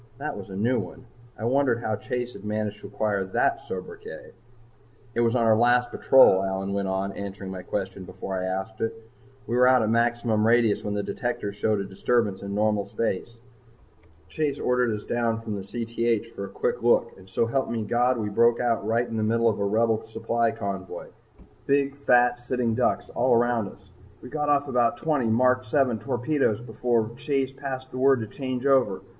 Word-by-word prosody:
that 145 Hz, +3 st, -4 dB
was 100 Hz, -1 st, -8 dB
a 95 Hz, -, -7 dB
new 120 Hz, +5 st, +1 dB
one. 115 Hz, +7 st, -8 dB, 0.3 s
I 110 Hz, -, -5 dB
wondered 130 Hz, -1 st, +2 dB
how 110 Hz, -, 0 dB
Chase 125 Hz, +3 st, -4 dB
had 100 Hz, -, -11 dB
managed 105 Hz, 0 st, -3 dB
to -, -, -8 dB
acquire 105 Hz, -3 st, -1 dB
that 95 Hz, -, 0 dB
sobriquet. 90 Hz, -1 st, -8 dB, 0.8 s
"It 115 Hz, -, -2 dB
was 115 Hz, 0 st, +2 dB
on 115 Hz, -2 st, +2 dB
our 110 Hz, -1 st, +5 dB
last 120 Hz, +2 st, +3 dB
patrol," 130 Hz, -8 st, +6 dB
Allyn 95 Hz, 0 st, -2 dB
went 100 Hz, -1 st, -1 dB
on, 95 Hz, +1 st, -1 dB
answering 100 Hz, -1 st, -6 dB
my 95 Hz, -1 st, -6 dB
question 95 Hz, 0 st, -4 dB
before 95 Hz, +1 st, -6 dB
I 95 Hz, 0 st, -2 dB
asked 95 Hz, +4 st, -4 dB
it. 115 Hz, -, -1 dB, 0.5 s
"We 120 Hz, -, -2 dB
were 125 Hz, 0 st, +5 dB
out 130 Hz, -2 st, +5 dB
at 110 Hz, -, 0 dB
maximum 115 Hz, -2 st, +2 dB
radius 115 Hz, -2 st, +3 dB
when 105 Hz, 0 st, -3 dB
the 100 Hz, -, -1 dB
detectors 105 Hz, -4 st, -3 dB
showed 105 Hz, 0 st, 0 dB
a -, -, -2 dB
disturbance 100 Hz, +1 st, 0 dB
in 100 Hz, 0 st, -5 dB
normal 105 Hz, -1 st, +1 dB
space. 115 Hz, +1 st, -3 dB, 0.9 s
Chase 150 Hz, -3 st, -2 dB
ordered 125 Hz, -2 st, +1 dB
us 105 Hz, -, -7 dB
down 115 Hz, -1 st, -1 dB
from 110 Hz, -3 st, -5 dB
Cth 115 Hz, +1 st, -2 dB
for 100 Hz, -, -6 dB
a -, -, -9 dB
quick -, -, -2 dB
look -, -, +3 dB
and 95 Hz, 0 st, -16 dB
so 95 Hz, +5 st, +1 dB
help 130 Hz, +4 st, -1 dB
me, 115 Hz, -2 st, -2 dB
God, 120 Hz, +3 st, +2 dB
we 105 Hz, -2 st, -2 dB
broke 115 Hz, +3 st, +3 dB
out 120 Hz, -3 st, 0 dB
right 115 Hz, +2 st, +1 dB
in 115 Hz, -, -4 dB
the -, -, 0 dB
middle 115 Hz, +2 st, +2 dB
of 105 Hz, -, -2 dB
a -, -, 0 dB
Rebel 110 Hz, +2 st, +1 dB
supply 115 Hz, +1 st, 0 dB
convoy 95 Hz, -4 st, -5 dB, 0.6 s
big, 140 Hz, 0 st, +2 dB
fat, 125 Hz, -3 st, +3 dB
sitting 120 Hz, -1 st, -1 dB
ducks 125 Hz, +2 st, 0 dB
all 125 Hz, 0 st, +2 dB
around 120 Hz, -2 st, +2 dB
us. 95 Hz, 0 st, -18 dB, 0.3 s
We 125 Hz, -, -9 dB
got 150 Hz, 0 st, -2 dB
off 145 Hz, 0 st, +2 dB
about 120 Hz, -3 st, +1 dB
twenty 145 Hz, -2 st, 0 dB
Mark 125 Hz, +3 st, +3 dB
VII 125 Hz, -1 st, +1 dB
torpedoes 120 Hz, +1 st, 0 dB
before 115 Hz, -1 st, -1 dB
Chase 135 Hz, -1 st, -1 dB
passed 130 Hz, -1 st, -6 dB
the 130 Hz, -, -5 dB
word 135 Hz, -2 st, +4 dB
to 110 Hz, -, -4 dB
change 130 Hz, +3 st, -4 dB
over. 125 Hz, -9 st, +3 dB
115 Hz, 195 wpm, -25 LUFS, 105-125 Hz, 0.9 s, patrol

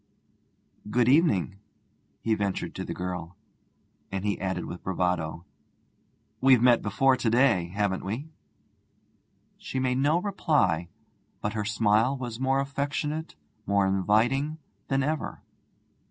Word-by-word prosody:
'Good 120 Hz, +2 st, +2 dB
evening,' 125 Hz, -, +3 dB, 0.6 s
he 115 Hz, -, +1 dB
ventured 100 Hz, -3 st, -2 dB
to -, -, -5 dB
the -, -, -6 dB
girl; 90 Hz, -1 st, -5 dB, 0.8 s
and 95 Hz, +1 st, -3 dB
he 100 Hz, -2 st, -1 dB
added 95 Hz, -1 st, -2 dB
with 90 Hz, -, -8 dB
bravado: 90 Hz, -3 st, -1 dB, 1.0 s
'We've 130 Hz, -1 st, +6 dB
met 120 Hz, -2 st, +5 dB
before 130 Hz, +6 st, +3 dB
to 115 Hz, -, 0 dB
day, 115 Hz, -7 st, +3 dB
haven't 100 Hz, +1 st, -1 dB
we?' 125 Hz, +11 st, -5 dB, 1.3 s
She -, -, -5 dB
made 130 Hz, 0 st, +1 dB
no 150 Hz, +5 st, +3 dB
reply, 150 Hz, -, +1 dB, 0.5 s
but 105 Hz, -, -3 dB
her 105 Hz, -2 st, -2 dB
smile 110 Hz, +4 st, +2 dB
was 120 Hz, -3 st, -6 dB
more 135 Hz, +1 st, +2 dB
affectionate, 145 Hz, +3 st, -3 dB, 0.3 s
more 100 Hz, 0 st, +3 dB
inviting, 110 Hz, -, +1 dB, 0.3 s
than 135 Hz, 0 st, +1 dB
ever. 155 Hz, +1 st, -3 dB
115 Hz, 125 wpm, -27 LUFS, 95-135 Hz, 1.3 s, We've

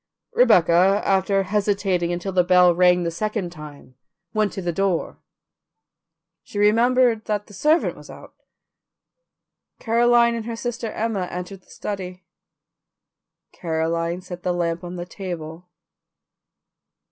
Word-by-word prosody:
Rebecca, 190 Hz, -, +4 dB
after 195 Hz, 0 st, +2 dB
hesitating 195 Hz, -3 st, 0 dB
until 175 Hz, +2 st, -3 dB
the 180 Hz, -1 st, +3 dB
bell 180 Hz, 0 st, +5 dB
rang 180 Hz, 0 st, +3 dB
the 170 Hz, -, -2 dB
second 210 Hz, 0 st, -3 dB
time, 150 Hz, -5 st, -12 dB, 0.4 s
went 215 Hz, -1 st, +1 dB
to 195 Hz, -, -5 dB
the 175 Hz, -, -1 dB
door; 190 Hz, -1 st, -1 dB, 1.2 s
she -, -, -10 dB
remembered 230 Hz, +2 st, +3 dB
that 210 Hz, -1 st, -2 dB
the 205 Hz, -, -16 dB
servant 305 Hz, -, +1 dB
was -, -, -14 dB
out. -, -, -12 dB, 1.4 s
Caroline 235 Hz, +1 st, +3 dB
and 230 Hz, -2 st, -4 dB
her 230 Hz, -, -4 dB
sister 235 Hz, -1 st, -4 dB
Emma 215 Hz, -5 st, -2 dB
entered 180 Hz, +2 st, -7 dB
the -, -, -30 dB
study. 185 Hz, -2 st, -6 dB, 1.3 s
Caroline 165 Hz, +1 st, -2 dB
set 180 Hz, -1 st, -9 dB
the 180 Hz, -, -1 dB
lamp 170 Hz, 0 st, -2 dB
on 175 Hz, 0 st, -7 dB
the 175 Hz, -1 st, -5 dB
table. 175 Hz, -2 st, -8 dB
185 Hz, 125 wpm, -22 LUFS, 175-215 Hz, 1.4 s, bell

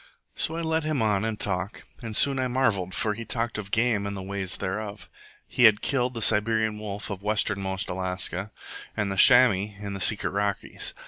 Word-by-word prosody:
So 160 Hz, -, -1 dB
I -, -, -3 dB
led 160 Hz, -1 st, -1 dB
him 155 Hz, -2 st, -1 dB
on 105 Hz, -2 st, +1 dB
in 110 Hz, -1 st, -2 dB
talk, 95 Hz, 0 st, -2 dB, 0.2 s
and 110 Hz, -3 st, -5 dB
soon 135 Hz, +3 st, +3 dB
I 130 Hz, -, 0 dB
marvelled, 110 Hz, -8 st, 0 dB
for 110 Hz, -3 st, 0 dB
he 115 Hz, +2 st, -7 dB
talked 115 Hz, -1 st, -1 dB
of 100 Hz, -2 st, -7 dB
game 110 Hz, -2 st, +1 dB
and 100 Hz, 0 st, -5 dB
the 95 Hz, -, -6 dB
ways 95 Hz, -1 st, -3 dB
thereof. 100 Hz, 0 st, -5 dB, 0.4 s
He 125 Hz, -, +3 dB
had 105 Hz, -2 st, +5 dB
killed 125 Hz, -2 st, 0 dB
the 115 Hz, -, -1 dB
Siberian 110 Hz, 0 st, +2 dB
wolf 105 Hz, -1 st, -6 dB
of 100 Hz, -1 st, -6 dB
westernmost 100 Hz, -2 st, -1 dB
Alaska, 95 Hz, +1 st, -2 dB, 0.5 s
and 100 Hz, -2 st, -1 dB
the -, -, -3 dB
chamois 105 Hz, -3 st, +5 dB
in 100 Hz, -1 st, -6 dB
the 100 Hz, -, -5 dB
secret 105 Hz, +3 st, +2 dB
Rockies. 100 Hz, 0 st, -2 dB
105 Hz, 195 wpm, -26 LUFS, 100-115 Hz, 0.5 s, had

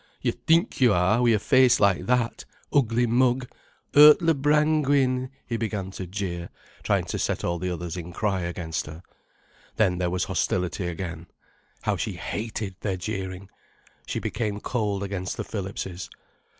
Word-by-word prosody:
"You -, -, 0 dB
think 165 Hz, -, +1 dB
you 120 Hz, -4 st, +6 dB
are—wi' 105 Hz, +7 st, +3 dB
a 110 Hz, -, +4 dB
face 130 Hz, +2 st, +4 dB
like 95 Hz, -2 st, +2 dB
that—Ugly 125 Hz, 0 st, 0 dB
Mug,—Urtler 130 Hz, -, +4 dB
Brangwin," 145 Hz, -4 st, +2 dB, 0.2 s
he 115 Hz, -, -2 dB
began 105 Hz, -4 st, -3 dB
to 95 Hz, -1 st, -6 dB
jeer, 90 Hz, -3 st, -4 dB, 0.3 s
trying -, -, +1 dB
to -, -, -4 dB
set -, -, -1 dB
all 85 Hz, 0 st, -1 dB
the 90 Hz, +1 st, -2 dB
others 85 Hz, -1 st, -4 dB
in 90 Hz, -1 st, -6 dB
cry 95 Hz, +1 st, -1 dB
against 85 Hz, -2 st, -3 dB
her. 80 Hz, +4 st, -10 dB, 0.7 s
Then 95 Hz, -5 st, +2 dB
there 90 Hz, -1 st, 0 dB
was 90 Hz, +1 st, -1 dB
hostility 90 Hz, 0 st, -1 dB
again. 85 Hz, -1 st, -5 dB, 0.6 s
How -, -, 0 dB
she -, -, -3 dB
hated 105 Hz, -3 st, -5 dB
their 95 Hz, -3 st, -2 dB
jeering. 95 Hz, -1 st, -5 dB, 0.6 s
She -, -, -3 dB
became 105 Hz, -3 st, -2 dB
cold 105 Hz, -4 st, -2 dB
against 95 Hz, -2 st, -4 dB
the -, -, -2 dB
Phillipses. 95 Hz, -3 st, -5 dB
100 Hz, 145 wpm, -25 LUFS, 90-125 Hz, 0.7 s, you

